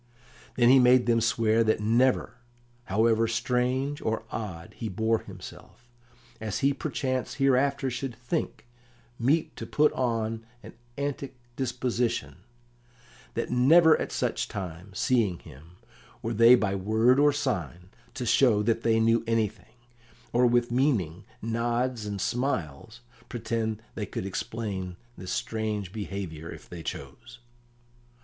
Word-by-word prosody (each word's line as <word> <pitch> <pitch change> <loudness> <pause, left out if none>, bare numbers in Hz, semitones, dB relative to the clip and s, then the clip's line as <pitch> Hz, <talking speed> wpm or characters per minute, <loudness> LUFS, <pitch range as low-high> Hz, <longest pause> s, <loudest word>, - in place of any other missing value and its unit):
Then 120 -1 +5
he 135 +1 +8
made 125 0 +5
them 115 -1 +3
swear 115 -1 +2
that 110 -1 +2
never, 120 +6 +1 0.5
however 115 +2 +2
strange 125 +5 0
or 110 0 -1
odd 90 -7 -6
he 115 - -4
bore 110 +3 +1
himself, 120 - -12 0.5
as 110 -2 -3
he 140 - +4
perchance 130 -1 -2
hereafter 135 -1 +2
should 125 0 -4
think 125 +5 -3 0.5
meet 145 +7 +1
to - - -6
put 150 0 +3
on 115 -3 -1 0.2
an - - -11 0.2
antic 140 -1 -3 0.2
disposition 120 - -1 1.0
that 115 - -2
never 160 +7 +6
at - - -3
such - - -1
times, 95 0 -7
seeing 110 -9 +2
him, 80 +2 -15 0.5
were 115 - -2
they 115 +3 +8
by 105 -5 0
word 110 +7 +3
or 145 0 +5
sign 90 - -3 0.2
to 130 -2 -3
show 110 -3 +4
that 115 +1 +1
they 115 -1 +2
knew 115 +1 +3
anything, 110 -2 -2 0.6
or 125 +1 +4
with 120 0 +2
meaning 115 - 0 0.2
nods 120 0 -1
and 100 -1 -4
smiles 115 - -2 0.3
pretend 110 -2 -3
they 105 - -4
could 95 - -5
explain 95 -2 -4 0.2
his 95 - -8
strange 105 -4 -3
behaviour 95 -7 -5
if - - -10
they 85 -2 -8
chose. 120 - -8
115 Hz, 130 wpm, -27 LUFS, 105-125 Hz, 1.0 s, he